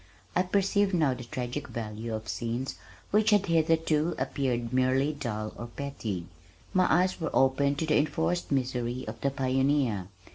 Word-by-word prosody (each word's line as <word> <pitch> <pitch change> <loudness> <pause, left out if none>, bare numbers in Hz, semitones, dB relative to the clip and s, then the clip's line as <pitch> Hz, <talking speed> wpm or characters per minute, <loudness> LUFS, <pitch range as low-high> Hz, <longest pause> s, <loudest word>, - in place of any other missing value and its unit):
I 180 - +4
perceived 195 +1 +2
now 150 -6 +3
the 125 - -7
tragic 125 +2 -4
value 110 0 -4
of 110 0 -6
scenes 120 +5 -2 0.4
which 215 +1 +4
had 205 -2 +4
hitherto 165 -1 +2
appeared 120 -4 -1
merely 130 +3 +2
dull 110 -7 -4
or 120 - -6
petty. 115 -9 -4 0.5
My 185 -1 +3
eyes 180 +2 +2
were 160 - 0
opened 140 +2 +3
to 160 - 0
the 155 - +3
enforced 160 +4 0
misery 125 -2 -1
of 110 +1 -7
the 140 - +2
pioneer. 135 -6 +1
135 Hz, 155 wpm, -29 LUFS, 120-160 Hz, 0.5 s, I